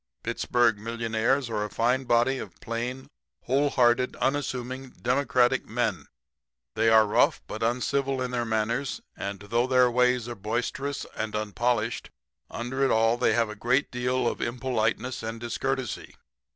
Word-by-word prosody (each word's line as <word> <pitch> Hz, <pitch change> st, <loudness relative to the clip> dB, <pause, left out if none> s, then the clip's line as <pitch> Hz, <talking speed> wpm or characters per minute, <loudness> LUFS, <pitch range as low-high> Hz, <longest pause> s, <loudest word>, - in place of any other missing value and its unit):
Pittsburg 120 Hz, -1 st, +1 dB
millionaires 115 Hz, +4 st, 0 dB
are 110 Hz, -3 st, -2 dB
a 105 Hz, -, -4 dB
fine 125 Hz, +5 st, +1 dB
body 120 Hz, +2 st, +2 dB
of -, -, -9 dB
plain, 120 Hz, +3 st, -4 dB, 0.4 s
wholehearted, 130 Hz, -2 st, +2 dB
unassuming, 130 Hz, -2 st, -2 dB
democratic 130 Hz, -1 st, +2 dB
men. 110 Hz, -, -1 dB, 0.7 s
"'They 115 Hz, -, +3 dB
are 110 Hz, -1 st, +6 dB
rough 105 Hz, -, +2 dB
but 110 Hz, -, -7 dB
uncivil 130 Hz, +3 st, 0 dB
in 125 Hz, -1 st, -2 dB
their 120 Hz, -1 st, 0 dB
manners, 115 Hz, +4 st, -1 dB
and 100 Hz, 0 st, -5 dB
though 115 Hz, +4 st, 0 dB
their 125 Hz, -1 st, +4 dB
ways 125 Hz, -1 st, +2 dB
are 120 Hz, -, -4 dB
boisterous 120 Hz, +6 st, -3 dB
and 110 Hz, -1 st, -3 dB
unpolished, 110 Hz, +2 st, -1 dB, 0.4 s
under 130 Hz, +3 st, -3 dB
it 135 Hz, -, +3 dB
all 115 Hz, 0 st, +3 dB
they -, -, +2 dB
have 115 Hz, -2 st, +2 dB
a -, -, -7 dB
great 125 Hz, +6 st, +1 dB
deal 125 Hz, +1 st, 0 dB
of -, -, -2 dB
impoliteness 120 Hz, 0 st, -1 dB
and 115 Hz, +1 st, -5 dB
discourtesy. 130 Hz, +1 st, -3 dB
120 Hz, 145 wpm, -27 LUFS, 115-130 Hz, 0.7 s, are